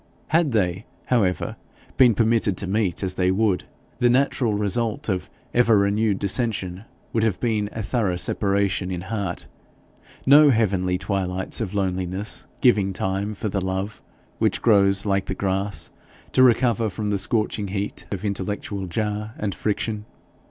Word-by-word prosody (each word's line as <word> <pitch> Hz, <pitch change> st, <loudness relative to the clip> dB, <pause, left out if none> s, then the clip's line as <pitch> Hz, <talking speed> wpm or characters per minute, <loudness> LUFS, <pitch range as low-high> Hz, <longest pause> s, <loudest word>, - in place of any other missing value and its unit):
Had 165 Hz, -1 st, +3 dB
they, 95 Hz, -2 st, 0 dB, 0.2 s
however, 100 Hz, -8 st, 0 dB, 0.4 s
been 125 Hz, -4 st, +5 dB
permitted 110 Hz, -4 st, +2 dB
to -, -, -1 dB
meet 95 Hz, -1 st, -1 dB
as 95 Hz, -1 st, -1 dB
they 90 Hz, 0 st, +1 dB
would, 95 Hz, -1 st, +1 dB, 0.3 s
the 120 Hz, -, +4 dB
natural 125 Hz, -3 st, +2 dB
result 110 Hz, +2 st, -1 dB
of 95 Hz, -2 st, -2 dB, 0.2 s
ever 115 Hz, -3 st, +4 dB
renewed 100 Hz, +1 st, +2 dB
dissension 100 Hz, -2 st, 0 dB, 0.3 s
would 115 Hz, -, +1 dB
have 110 Hz, -4 st, +1 dB
been 110 Hz, -4 st, 0 dB
a 110 Hz, -, -5 dB
thorough 105 Hz, -4 st, 0 dB
separation 100 Hz, 0 st, 0 dB
in 90 Hz, -2 st, -3 dB
heart, 95 Hz, -2 st, -4 dB, 0.8 s
no 145 Hz, +2 st, +8 dB
heavenly 95 Hz, -6 st, +1 dB
twilights 95 Hz, +1 st, -1 dB
of 105 Hz, -2 st, -3 dB
loneliness 95 Hz, +1 st, -2 dB
giving 105 Hz, -6 st, +3 dB
time 95 Hz, +3 st, -2 dB
for 110 Hz, -, -3 dB
the 100 Hz, 0 st, -1 dB
love 95 Hz, +2 st, -3 dB, 0.4 s
which -, -, +1 dB
grows 100 Hz, -2 st, +4 dB
like 100 Hz, -2 st, 0 dB
the 95 Hz, -, -2 dB
grass 95 Hz, +1 st, -2 dB, 0.4 s
to -, -, +3 dB
recover 120 Hz, -3 st, +4 dB
from 105 Hz, +2 st, -3 dB
the 100 Hz, -, 0 dB
scorching 105 Hz, 0 st, -1 dB
heat 100 Hz, +1 st, -4 dB
of 100 Hz, 0 st, -4 dB
intellectual 100 Hz, 0 st, -3 dB
jar 105 Hz, +3 st, -3 dB
and 105 Hz, -2 st, -2 dB
friction. 105 Hz, +1 st, -2 dB
100 Hz, 150 wpm, -23 LUFS, 95-110 Hz, 0.8 s, no